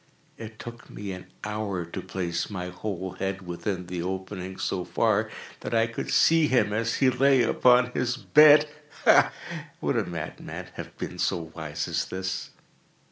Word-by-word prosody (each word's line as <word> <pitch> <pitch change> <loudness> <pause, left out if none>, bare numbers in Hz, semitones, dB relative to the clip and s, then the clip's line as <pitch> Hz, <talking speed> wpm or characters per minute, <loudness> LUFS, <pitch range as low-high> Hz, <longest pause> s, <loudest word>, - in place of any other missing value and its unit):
It 110 0 -9
took 120 +1 -10
me 100 -1 -6
an 90 -1 -8 0.2
hour 105 -4 -3
to 85 - -6
place 85 -3 -3
my 90 -3 -4
whole 95 0 -4
head 95 -1 -3
within 90 +1 -3
the 90 -1 -4
opening 95 +1 -5
so 90 -2 -2
far - - +1 0.3
that - - -3
I 115 0 +4
could 115 0 -5
see 165 -2 +5
him 105 -6 +2
as 115 +2 0
he 130 -2 +4
lay 135 0 +4
upon 125 +1 +4
his 120 0 -1
bed. 150 +2 +7 0.4
Ha!—would - - +2
a - - +2
madman - - -6
have - - -9
been - - -6
so 80 -2 -1
wise 75 -2 -4
as - - -1
this? 95 0 -4
100 Hz, 160 wpm, -27 LUFS, 90-120 Hz, 0.4 s, bed